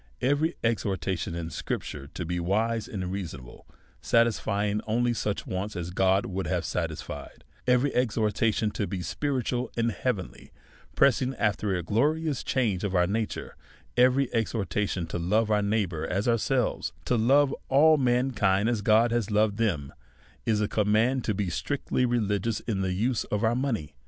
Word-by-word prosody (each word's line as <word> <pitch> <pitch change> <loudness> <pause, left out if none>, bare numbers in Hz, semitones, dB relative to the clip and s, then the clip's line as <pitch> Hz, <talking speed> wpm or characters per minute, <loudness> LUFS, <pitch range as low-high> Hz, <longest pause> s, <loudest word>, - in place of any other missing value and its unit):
Every 145 +6 +1
exhortation 95 -6 -1
in 85 -1 -4
scripture 70 -2 -4
to 90 - -3
be 90 +1 -2
wise 110 +5 0
and 95 -3 -4
rea 100 +1 -2
sonable, 70 -8 -10 0.4
satisfying 105 -3 +1
only 120 +2 +1
such 105 -3 -2
Avants 95 +3 -4
as 90 0 -4
God 95 +2 +2
would 95 0 -3
have 90 -2 -1
satisfied; 80 -4 -5 0.2
every 125 +3 +3
exhortation 110 -2 +1
to 105 - -2
be 95 -3 -4
spiritual 130 -2 -2
and 115 0 +1
heavenly, 95 - -4 0.4
pressing 130 -1 +3
after 105 -3 0
a 90 - -2
glorious 145 - 0
change 110 -8 0
of 100 -2 -1
our 90 -1 +4
na 110 +4 0
ture; - - -7 0.4
every 130 +1 +3
exhortation 105 -5 -1
to 85 - -4
love 105 +6 +1
our 105 -1 +3
neighbour 100 -7 -1
as 100 +5 -1
our 115 -1 +3
selves, 125 -1 0
to 125 - +1
love 135 +5 +4 0.2
all 155 +3 +6
mankind 120 -6 +2
as 115 -4 0
God 110 +2 +4
has 120 -3 0
loved 105 -1 +2
them, 85 -12 -1 0.5
is 110 -2 +2
a 105 - +1
command 110 +6 +2
to 105 - 0
be 95 -3 -1
strictly 125 - -1
religious 110 -2 0
in 100 -5 -2
the 95 -1 0
use 115 +5 0
of 105 +1 -2
our 110 +1 +3
money. 115 - -2
105 Hz, 165 wpm, -27 LUFS, 95-120 Hz, 0.5 s, all